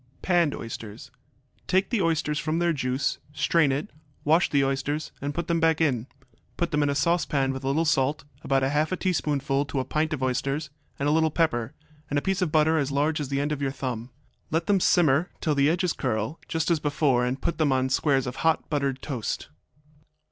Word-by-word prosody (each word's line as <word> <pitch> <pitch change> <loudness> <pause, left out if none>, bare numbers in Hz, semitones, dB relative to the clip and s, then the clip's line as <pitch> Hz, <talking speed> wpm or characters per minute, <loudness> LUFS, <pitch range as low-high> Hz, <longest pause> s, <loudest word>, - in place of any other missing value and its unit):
Panned 175 -5 +2
Oysters 115 +3 -8 0.6
Take 190 +3 +1
the 230 -5 +1
oysters 160 -3 0
from 160 0 -1
their 170 0 +2
juice, 130 -1 -1
strain 155 -1 +2
it, 145 +9 -3 0.3
wash 160 +4 +3
the 140 -2 +3
oysters, 140 +3 -2
and 145 +1 -2
put 170 +4 -4
them 170 -1 +1
back 160 -1 +3
in. 130 -7 +1 0.5
Put 170 - -1
them 150 -1 +1
in 145 - +2
a 140 - 0
saucepan 145 -3 +1
with 135 0 -6
a - - -2
little 155 +5 +1
salt, 145 -1 +1 0.2
about 135 -1 +1
half 150 +4 +1
a 185 - 0
teaspoonful 145 -6 0
to 140 - -3
a 130 - -2
pint 155 +1 -1
of 145 -4 -2
oysters, 135 +3 -1 0.3
and 140 - -1
a - - +3
little 160 +1 +3
pepper, 145 -5 0 0.3
and 145 - 0
a - - +2
piece 190 -1 0
of 175 -4 0
butter 160 +1 +3
as 140 -1 -1
large 150 +2 +1
as 140 - -4
the 140 0 0
end 145 +1 -1
of 145 -2 -2
your 140 - +1
thumb. 125 -3 -4 0.4
Let 165 +2 0
them 200 -2 +3
simmer 165 -1 +3
till 155 - 0
the 140 0 +3
edges 180 +1 +1
curl, 115 +3 -2
just 160 +1 -1
as 165 - +3
before, 145 -4 +1
and 125 +2 -1
put 170 - -2
them 150 -3 +3
on 130 0 +1
squares 135 0 +2
of 125 - -5
hot 160 -1 +1
buttered 140 -3 -1
toast. 125 - -4
145 Hz, 215 wpm, -26 LUFS, 135-160 Hz, 0.6 s, wash